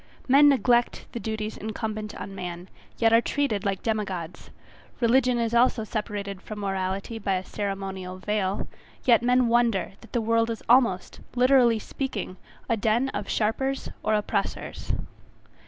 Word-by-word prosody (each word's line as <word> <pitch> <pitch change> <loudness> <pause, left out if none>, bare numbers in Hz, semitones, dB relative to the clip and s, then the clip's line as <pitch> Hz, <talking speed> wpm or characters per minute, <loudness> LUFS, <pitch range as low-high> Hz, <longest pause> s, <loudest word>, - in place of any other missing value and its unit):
Men 285 +3 +7
neglect 245 -3 +2
the 235 - -5
duties 220 -1 -4
incumbent 215 0 -4
on 195 - -7
man, 180 -1 -6 0.3
yet 225 -1 +3
are 230 - +7
treated 235 -7 -1
like 195 -2 -2
demi 220 -2 +1
gods; 180 -4 -7 0.5
religion 250 +1 +3
is 230 -1 0
also 235 -1 +3
separated 205 -3 -4
from 215 - -8
morality 195 +3 -2
by 195 -2 0
a 185 0 -3
ceremonial 195 -2 -4
veil, 195 0 -1 0.4
yet 235 -3 +6
men 250 0 +3
wonder 230 -5 +2
that 230 - -16
the 240 - +1
world 230 0 +2
is 230 - -4
almost, 235 -6 +3 0.2
literally 250 -2 +5
speaking, 240 -4 -4 0.3
a 230 - +2
den 225 +4 +1
of - - -5
sharpers 265 +5 0
or 215 - +1
oppressors. 210 0 -2
220 Hz, 150 wpm, -26 LUFS, 195-240 Hz, 0.5 s, Men